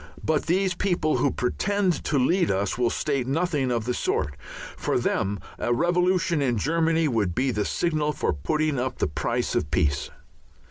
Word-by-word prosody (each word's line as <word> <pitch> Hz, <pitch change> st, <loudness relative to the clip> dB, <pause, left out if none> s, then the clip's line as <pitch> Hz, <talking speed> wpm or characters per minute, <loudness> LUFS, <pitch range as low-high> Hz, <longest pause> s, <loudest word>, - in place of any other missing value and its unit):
But 155 Hz, -2 st, 0 dB
these 185 Hz, +2 st, +2 dB
people 175 Hz, -4 st, 0 dB
who 140 Hz, -, +2 dB
pretend 190 Hz, +8 st, 0 dB
to 150 Hz, -, +1 dB
lead 170 Hz, +7 st, +2 dB
us 100 Hz, +1 st, 0 dB
will 120 Hz, -1 st, +1 dB
state 140 Hz, -3 st, -1 dB
nothing 145 Hz, -3 st, 0 dB
of 115 Hz, -2 st, -1 dB
the 125 Hz, -, 0 dB
sort. 75 Hz, -10 st, -1 dB, 0.4 s
For -, -, -1 dB
them 100 Hz, 0 st, 0 dB, 0.2 s
a 120 Hz, -, -1 dB
revolution 175 Hz, +1 st, +2 dB
in 125 Hz, -4 st, +1 dB
Germany 165 Hz, +5 st, +2 dB
would 105 Hz, -9 st, 0 dB
be 130 Hz, +1 st, +1 dB
the 105 Hz, -3 st, -1 dB
signal 155 Hz, -3 st, 0 dB
for -, -, -1 dB
putting 155 Hz, -, -1 dB
up 130 Hz, 0 st, -2 dB
the -, -, +1 dB
price 75 Hz, -, -2 dB
of -, -, 0 dB
peace. 70 Hz, -1 st, 0 dB
145 Hz, 175 wpm, -25 LUFS, 120-170 Hz, 0.4 s, these